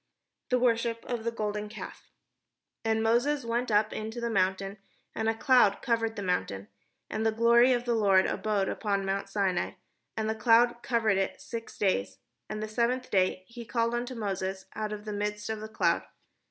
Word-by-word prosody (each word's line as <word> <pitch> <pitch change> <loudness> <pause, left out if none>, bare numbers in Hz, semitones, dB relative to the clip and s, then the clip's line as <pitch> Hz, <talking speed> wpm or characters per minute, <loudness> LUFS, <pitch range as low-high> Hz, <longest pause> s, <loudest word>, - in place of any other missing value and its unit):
THE 250 - +3
WORSHIP 230 -1 +1
OF 240 -2 -3
THE 235 - -1
GOLDEN 210 -2 -3
CALF - - -9 0.7
And 220 0 +1
Moses 245 +5 +2
went 235 +2 -1
up 215 0 +2
into 220 +2 -5
the 235 0 -2
mount, 190 -2 +2
and 195 +1 -6 0.5
a 225 - 0
cloud 235 -4 +4
cov 230 -3 +2
ered 225 0 -2
the 205 - -4
mount. 180 - 0 0.6
And 215 - -1
the 225 - +3
glory 235 +3 +5
of 245 -1 +1
the 240 - +1
Lord 195 -4 +4
abode 205 -3 0
upon 200 -2 -1
mount 195 +1 -2
Sinai, 195 -3 0 0.4
and 220 -1 -1
the 220 - +1
cloud 235 +2 +4
covered 225 -5 +1
it 195 - -2
six 230 -1 -7
days: 100 - 0 0.3
and 215 0 -4
the - - -3
seventh 240 +3 -1
day 185 -1 +2
he 235 +2 -9
called 230 0 0
unto 245 +2 -3
Moses 190 -3 -3
out 215 -1 -3
of 210 0 -6
the 210 - -4
midst 210 +1 -3
of 220 - -3
the 215 - -7
cloud. 220 - +2
220 Hz, 190 wpm, -29 LUFS, 205-235 Hz, 0.7 s, glory